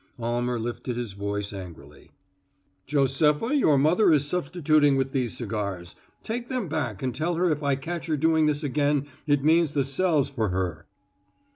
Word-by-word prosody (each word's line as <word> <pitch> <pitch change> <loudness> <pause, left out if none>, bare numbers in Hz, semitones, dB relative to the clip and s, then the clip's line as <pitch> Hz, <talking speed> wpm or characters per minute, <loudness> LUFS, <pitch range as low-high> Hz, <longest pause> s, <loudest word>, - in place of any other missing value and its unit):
Almer 120 +1 -1
lifted 120 +1 -4
his 120 -5 -4
voice 100 +1 -4
angrily: 90 -4 -11 0.8
"Josepha, 150 - +2
your 155 - +4
mother 165 +8 +4
is 145 -2 +3
substituting 155 -2 +2
with 135 0 0
these 125 -5 -2
cigars. 100 -6 -4 0.3
Take 240 +2 -4
them 255 -7 -2
back 135 -10 -3
and 130 -1 -1
tell 165 +6 -1
her 175 0 +2
if 150 -1 -1
I 140 -2 +1
catch 170 +5 -5
her 155 -2 0
doing 160 +1 +3
this 150 0 0
again 145 0 +1 0.2
it 145 -2 +2
means 160 -1 +3
the 140 -2 +2
cells 150 0 +1
for 115 -7 -2
her." 90 -4 -3
140 Hz, 165 wpm, -26 LUFS, 120-160 Hz, 0.8 s, your